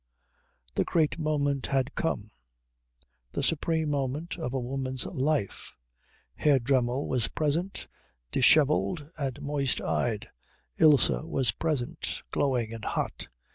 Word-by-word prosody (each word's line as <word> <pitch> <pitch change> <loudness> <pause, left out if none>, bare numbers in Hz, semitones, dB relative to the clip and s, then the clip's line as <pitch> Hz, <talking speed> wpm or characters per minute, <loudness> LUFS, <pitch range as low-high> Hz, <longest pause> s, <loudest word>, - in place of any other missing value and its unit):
The - - +1
great 160 -1 +1
moment 145 -3 0
had 135 0 0
come: 160 - -2 1.0
the - - -2
supreme 160 -1 +1
moment 145 +4 -2
of 125 - -3
a 135 - -1
woman's 130 0 0
life. 145 - -2 0.6
Herr 145 -3 +3
Dremmel 130 +1 +1
was 125 -4 +2
present, 160 +5 -2 0.4
dishevelled 150 +3 +3
and 135 -1 -2
moist 140 -2 0
eyed; 110 -4 -1 0.5
Ilse 150 -5 +6
was 130 -4 +1
present, 145 -2 -3
glowing 125 -5 0
and 115 -2 -8
hot. - - -3
140 Hz, 115 wpm, -28 LUFS, 125-155 Hz, 1.0 s, Ilse